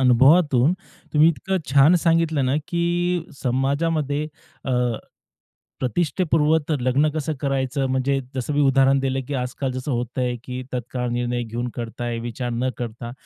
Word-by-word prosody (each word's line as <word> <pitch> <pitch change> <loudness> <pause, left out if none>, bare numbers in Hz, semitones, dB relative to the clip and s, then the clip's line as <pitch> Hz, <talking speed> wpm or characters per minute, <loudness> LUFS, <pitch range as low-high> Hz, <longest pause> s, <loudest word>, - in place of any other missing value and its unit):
अनुभवातून 135 +3 +5 0.4
तुम्ही 155 +2 +6
इतकं 170 +6 -1 0.2
छान 140 +5 +6
सांगितलं 165 -4 +3
ना, 130 +3 +1
की 175 0 0 0.2
समाजामध्ये 145 +3 0 0.4
अ, 130 - -1 1.1
प्रतिष्ठेपूर्वक 160 +2 +1
लग्न 130 +5 +2
कसं 155 0 -2
करायचं? 135 -1 0
म्हणजे 135 +1 +1
जसं 130 +3 -2
मी 145 - +2
उदाहरण 135 0 +4
दिलं, 135 0 -1
की 145 - -3
आज-काल 130 +1 -2
जसं 130 +3 -4
होतंय, 125 +1 -1
की 125 0 -5
तत्काळ 125 0 -3
निर्णय 120 0 -1
घेऊन 120 +1 -4
करताय, 120 0 -4
विचार 120 +1 -4
न 120 +2 -1
करता. 120 0 -5
135 Hz, 135 wpm, -23 LUFS, 125-150 Hz, 1.1 s, तुम्ही